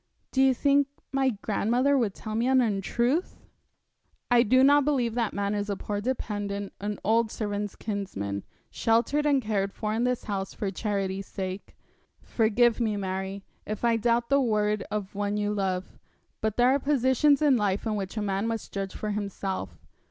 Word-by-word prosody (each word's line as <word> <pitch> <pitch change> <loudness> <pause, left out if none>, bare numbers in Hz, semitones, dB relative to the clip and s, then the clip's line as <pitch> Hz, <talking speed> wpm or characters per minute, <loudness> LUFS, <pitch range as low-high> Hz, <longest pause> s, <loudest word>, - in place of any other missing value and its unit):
'Do 265 - +2
you 265 0 +6
think 280 +2 +3 0.2
my 270 -1 +2
grandmother 235 +5 +1
would 225 -7 +1
tell 215 - -6
me 230 +3 +1
an 260 0 +4
untruth?' 240 - 0 0.9
'I 240 -1 +6
do 255 +3 +4
not 285 +1 +6
believe 260 -5 +1
that 230 -2 0
man 200 0 -1
is 205 0 -2
a 200 - 0
poor 205 +1 -3
dependent, 205 -5 -3
an 205 0 -3
old 225 +1 +2
servant's 205 -2 -3
kinsman, 100 - -4 0.3
sheltered 240 +7 +2
and 275 -3 +3
cared 200 -2 0
for 215 +1 -3
in 225 +2 0
this 250 -1 0
house 195 -2 -4
for 200 -2 -2
charity's 195 -1 -2
sake. 190 0 -6 0.5
Forgive 230 +1 +2
me, 220 -3 0
Mary, 190 0 -4 0.2
if 215 +2 -3
I 235 -1 +4
doubt 235 +1 +1
the 280 0 +5
word 210 -3 +1
of 205 -2 -4
one 205 0 -1
you 210 0 0
love; 190 -2 -2 0.4
but 220 -1 -1
there 245 +1 +5
are 275 - +3
positions 275 +1 +3
in 295 -3 +4
life 205 -3 0
in 220 -1 0
which 195 +1 -4
a 215 - 0
man 200 +1 -1
must 225 -2 -4
judge 195 -1 -4
for 215 - -3
himself. 195 - -4
215 Hz, 180 wpm, -27 LUFS, 200-245 Hz, 0.9 s, you